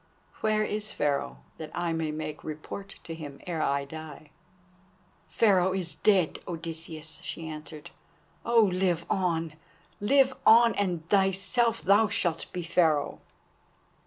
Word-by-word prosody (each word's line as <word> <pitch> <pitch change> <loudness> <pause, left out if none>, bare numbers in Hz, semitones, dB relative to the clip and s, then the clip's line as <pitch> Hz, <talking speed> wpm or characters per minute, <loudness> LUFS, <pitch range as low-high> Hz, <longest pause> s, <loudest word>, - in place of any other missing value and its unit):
Where 215 0 +2
is 210 0 -2
Pharaoh, 65 - -2 0.2
that 155 -1 -6
I 175 -1 -1
may 160 -1 -1
make 155 0 -5
report 160 +6 -7
to 165 - -7
him 145 -4 -8
ere 170 -3 -2
I 140 -1 0
die?" 155 0 -10 1.0
"Pharaoh 190 -4 +3
is 180 -3 -2
dead, 190 -6 +2
Odysseus," 165 -2 -6
she 165 -1 -6
answered. 155 -1 -8 0.5
"Oh, 235 -1 +4
live 180 -3 +1
on! 165 -4 0 0.5
live 265 +5 +4
on! 230 +1 +7
and 175 -5 -2
thyself 200 +4 +2
thou 205 +3 +5
shalt 170 -4 -1
be 180 - -4
Pharaoh." 165 -3 +1
170 Hz, 130 wpm, -28 LUFS, 155-200 Hz, 1.0 s, on